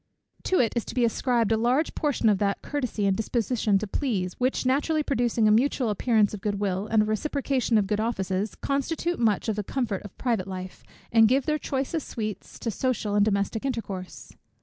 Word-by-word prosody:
To 375 - +2
it 230 -3 +2
is 235 - 0
to - - -7
be 245 -2 +3
ascribed 235 -1 +1
a 220 - +3
large 250 +7 +1
portion 290 -6 0
of 205 -3 +3
that 200 -1 0
courtesy 250 -8 -2
and 195 -1 +3
disposition 225 -1 +1
to 210 - -2
please, 195 -5 -2
which 255 +1 0
naturally 295 +4 +1
producing 240 -5 +1
a - - +5
mutual 245 0 +2
appearance 215 0 +2
of 205 - -6
good 205 -1 -2
will, 195 0 -1
and 220 -1 +3
a - - -1
reciprocation 255 +1 0
of 205 - +2
good 210 +1 -1
offices, 195 -3 -1
constitute 325 +5 -2
much 220 -3 +1
of 215 -2 -1
the 210 - -1
comfort 220 -3 -2
of 205 - -12
private 230 -7 -1
life, 185 -1 -7 0.3
and 225 -1 +6
give 260 +3 +2
their 305 0 0
choicest 275 +4 -2
sweets 215 -4 -5
to 230 - -3
social 220 -2 -1
and 205 0 +4
domestic 200 +1 0
intercourse. 210 -8 -5
225 Hz, 200 wpm, -26 LUFS, 205-260 Hz, 0.3 s, and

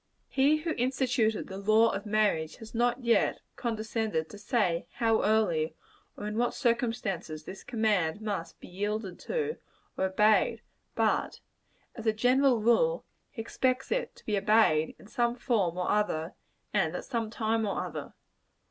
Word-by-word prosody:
He 280 +3 +3
who 320 +2 -3
instituted 250 -3 +1
the 190 0 -7
law 215 +3 +4
of 200 +2 -4
marriage, 205 -7 +1
has 220 -1 -12
not, 240 +1 +2
indeed, 235 -3 +2 0.2
condescended 220 -7 -2
to 205 - -10
say 205 -6 0
how 225 -1 +2
early 180 -8 +1 0.4
or 205 - -6
in 210 +2 -2
what 245 - +1
circumstances 225 - -1
this 190 - -9
command 210 -7 +1
must 200 -6 -4
be - - -11
yielded 205 0 -3
to, 460 -1 -2 0.4
or 190 - 0
obeyed; 210 +3 +3 0.3
but, - - +1 0.5
as 230 -2 -6
a 220 - +4
general 250 +2 +3
rule, 485 - +3 0.2
he 225 -5 -6
requires 255 +3 -1
it - - -1
to - - -19
be 210 - 0
obeyed, 200 -7 +3
in - - -16
some 235 +3 0
form 210 -9 0
or 180 - 0
other, 185 -5 0 0.4
and - - +1
at - - -5
some 230 -4 -2
time 225 0 0
or 200 - -2
other. - - -7
220 Hz, 155 wpm, -29 LUFS, 200-240 Hz, 0.5 s, law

